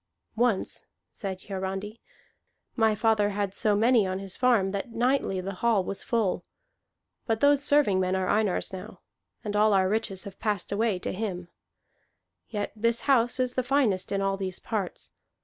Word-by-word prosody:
"Once," 230 -4 0 0.2
said 190 -2 -6
Hiarandi, 195 +3 -5 0.7
"my 220 -2 +3
father 215 -1 +2
had 200 -1 -2
so 210 +1 +2
many 225 -1 +4
on 185 0 -2
his 195 -1 -6
farm 230 -7 +3
that 200 +4 -3
nightly 240 -4 +1
the 195 +2 -4
hall 230 -5 +3
was 195 +2 -4
full. 225 -6 0 0.8
But 225 -2 +1
those 285 +1 +4
serving 285 -11 +3
men 185 0 +1
are 190 -1 0
Einar's 205 -2 +1
now, 185 - -8 0.4
and 210 -2 -3
all 210 0 +4
our 190 -1 +4
riches 200 -2 -1
have 200 -3 -10
passed 205 -5 -2
away 210 -1 +1
to 180 - -4
him. 185 -4 -4 1.0
Yet 205 -2 -3
this 230 +2 +1
house 245 -3 +2
is 250 -1 0
the 255 - +1
finest 245 -8 +1
in 195 0 0
all 195 0 0
these 190 -1 -3
parts. 205 -5 -4
205 Hz, 165 wpm, -27 LUFS, 190-230 Hz, 1.0 s, many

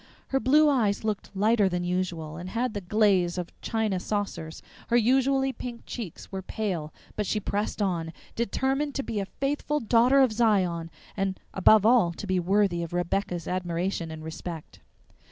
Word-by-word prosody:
Her 270 - +2
blue 300 +4 +5
eyes 225 -9 +2
looked 215 -2 -2
lighter 210 0 +3
than 180 -1 -2
usual 175 -3 -2
and 175 +3 -7
had 235 +2 -1
the 205 - -4
glaze 185 -3 +2
of 175 -1 -4
china 220 -4 0
saucers; 195 -5 -4 0.2
her 240 - +3
usually 265 +3 +3
pink 240 -1 -7
cheeks 215 -10 -7
were 190 -1 -4
pale, 185 -6 -3 0.2
but 210 -2 -2
she 215 - 0
pressed 205 +1 -2
on, 170 -4 -1 0.2
determined 265 +5 -1
to 275 - -1
be 220 -5 -3
a 195 - -3
faithful 290 +4 -1
Daughter 245 +3 +4
of 260 -3 +4
Zion, 185 -7 +1 0.3
and 195 -1 -1
above 205 +2 +5
all 225 -7 +5
to 205 - -7
be 185 -2 +1
worthy 190 -1 +2
of 170 0 -5
Rebecca's 175 0 -1
admiration 180 -1 -2
and 160 0 -8
respect. 160 0 -7
200 Hz, 170 wpm, -27 LUFS, 175-235 Hz, 0.3 s, blue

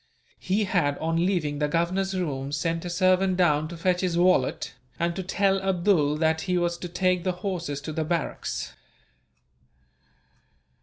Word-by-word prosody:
He 200 +3 0
had, 170 -7 +1
on 165 +2 0
leaving 155 -7 -1
the 150 - +1
Governor's 185 +5 0
room, 140 -6 -3
sent 165 +3 -1
a - - -3
servant 185 +1 +2
down 155 -4 +3
to 170 +1 -8
fetch 180 +1 +1
his 180 -2 0
wallet, 175 -10 +2 0.3
and 170 0 0
to 190 - -3
tell 195 +1 +1
Abdool 175 -6 +2
that 160 0 +1
he 180 -1 0
was 175 0 0
to 175 - -6
take 180 0 +1
the 185 - +1
horses 170 -7 -3
to 155 +2 -6
the 160 - -1
barracks. 160 - -3
175 Hz, 160 wpm, -26 LUFS, 155-185 Hz, 0.3 s, down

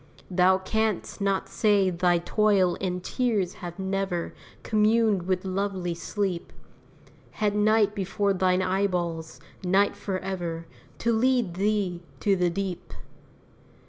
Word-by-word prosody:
Thou 185 +1 +4
canst 215 +1 -2
not 195 -1 0
say 205 -3 +2
thy 175 0 +2
toil 190 0 +2
and 180 -1 -2
tears 215 -8 0
have 175 -1 -6
never 190 -2 -2 0.3
Communed 215 -3 +2
with 185 0 0
lovely 190 -2 -2
sleep! 180 +1 -3 0.8
Had 210 -1 0
night 210 0 +3
before 200 0 0
thine 185 0 +2
eyeballs 180 -4 -1 0.2
night 190 +3 +3
forever 185 -4 -4 0.3
To 235 0 +1
lead 240 -4 +2
thee 195 -2 0 0.2
to 200 -2 +3
the 180 -1 +2
deep! 190 0 -4
190 Hz, 115 wpm, -26 LUFS, 180-205 Hz, 0.8 s, Thou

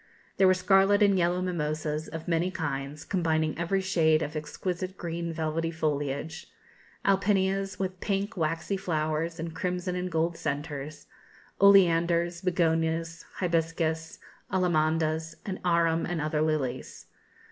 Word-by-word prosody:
There 190 - +5
were 185 - +5
scarlet 195 +2 +4
and 200 -1 +4
yellow 180 0 +1
mimosas, 155 -3 -2
of 160 0 -7
many 170 +1 +1
kinds, 145 -4 -4
combining 160 -4 0
every 175 +4 0
shade 160 -4 +3
of 150 +2 -5
exquisite 180 +4 -4
green 170 0 -4
velvety 160 +1 -1
foliage, 150 0 -3 0.6
alpinias, 195 0 +1
with 185 -1 -3
pink, 200 +2 -2
waxy 165 +3 -1
flowers 160 -1 -2
and 165 0 -4
crimson 180 +1 -2
and 180 0 -3
gold 165 +1 0
centres, 145 0 -4 0.6
oleanders, 170 -3 +5
begonias, 165 -2 0
hibiscus, 165 -2 -1 0.3
allamandas, 160 -3 +1
and 190 -2 -4
arum 170 -2 +2
and 175 -2 -2
other 150 0 0
lilies. 155 -5 -2
165 Hz, 125 wpm, -28 LUFS, 155-185 Hz, 0.6 s, There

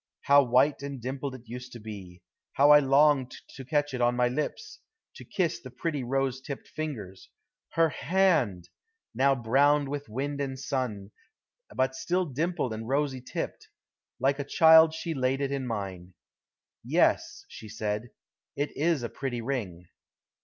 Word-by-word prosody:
How 140 0 +6
white 130 +3 +2
and 140 -1 -6
dimpled 130 +2 -4
it 125 - -12
used 125 +2 -8
to 120 - -8
be. 100 -5 -10 0.3
How 145 +2 +5
I 150 - +9
longed 140 -1 +3
to 135 - -10
catch 145 +1 0
it 125 - -3
to 120 0 +3
my 125 0 +2
lips, 145 +4 -4 0.4
to - - -10
kiss 160 -1 -1
the 130 - -10
pretty 145 +1 -3
rosy 135 +1 -1
tipped 140 -1 -7
fingers! 110 -12 -6 0.4
Her 165 -1 +3
hand! 145 - +1 0.4
Now 135 +1 +3
brown 140 +4 +2
with 145 -4 -5
wind 140 +5 -3
and 135 -1 -3
sun, 125 -7 -3 0.6
but 130 0 +1
still 180 +7 -1
dimpled 155 -3 -2
and 110 +1 -6
rosy 135 -1 0
tipped. - - -5 0.5
Like 135 +2 +1
a - - -1
child 160 +2 +6
she 165 0 -4
laid 130 -1 0
it 140 -1 -1
in 135 -2 -2
mine. 95 -5 -5 0.7
"Yes," - - +1
she 110 - -11
said, 110 +1 -3 0.5
"it 145 +1 -3
is 155 -3 +1
a - - -1
pretty 125 -4 -4
ring." 100 -10 -4
135 Hz, 160 wpm, -28 LUFS, 120-145 Hz, 0.7 s, I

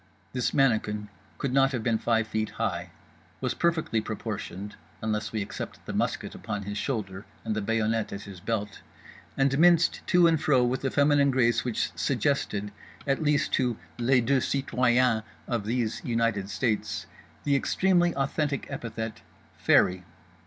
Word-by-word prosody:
This 125 -2 0
mannikin 105 -6 +1 0.3
could 140 -3 -2
not 135 0 +4
have 120 -3 -2
been 115 -1 +1
five 115 -1 +2
feet 110 0 -2
high, - - -2 0.5
was - - -1
perfectly 165 -10 +1
proportioned 105 -2 -5 0.2
(unless 110 -1 -2
we 110 -2 -1
except - - -7
the - - -5
musket - - -1
upon 105 -1 -5
his 105 +1 -4
shoulder 100 -7 -3 0.2
and 110 -1 -1
the 110 - -1
bayonet 110 +1 0
at 100 +1 -6
his 100 -3 -10
belt), 105 +1 -3 0.6
and 135 0 +3
minced 170 0 +5
to 175 -1 +5
and 165 -2 +3
fro 130 -4 +4
with 125 +2 -1
a 135 - +1
feminine 145 0 +4
grace 125 -3 +2
which 120 -3 -2
suggested—at 105 +7 -2
least 150 -2 +2
to 125 -4 +1 0.2
les 125 +1 +4
deux 130 +3 +2
citoyens 125 -4 +2 0.3
of 115 -4 -1
These 115 -1 -1
United 115 -5 0
States—the 115 +5 -2
extremely 175 +4 +2
authentic 140 0 -1
epithet 115 -1 -5 0.3
"fairy." 90 0 +3
115 Hz, 145 wpm, -27 LUFS, 110-135 Hz, 0.6 s, minced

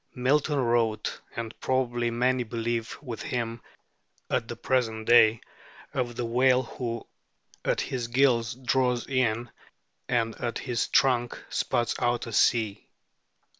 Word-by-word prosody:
Milton 145 +4 +2
wrote 115 -4 0
and 115 -1 -4
probably 120 -2 0
many 125 +2 +1
believe 115 0 -3
with 120 -5 -6
him 115 -2 -3 0.7
at - - 0
the - - -5
present 115 -4 0
day 115 -2 +6 0.5
of 120 -2 -2
the 120 - -2
whale 125 +2 +3
who 115 -1 -5 0.6
"at - - +1
his 125 -3 -3
gills 120 -2 +2
draws 125 -1 +1
in 120 -3 0 0.6
and 115 -2 +1
at 120 -1 -2
his 120 -4 -1
trunk 120 -3 +2
spouts 120 -1 0
out 120 0 0
a 115 - -7
sea." 110 -2 +2
120 Hz, 130 wpm, -27 LUFS, 115-125 Hz, 0.7 s, day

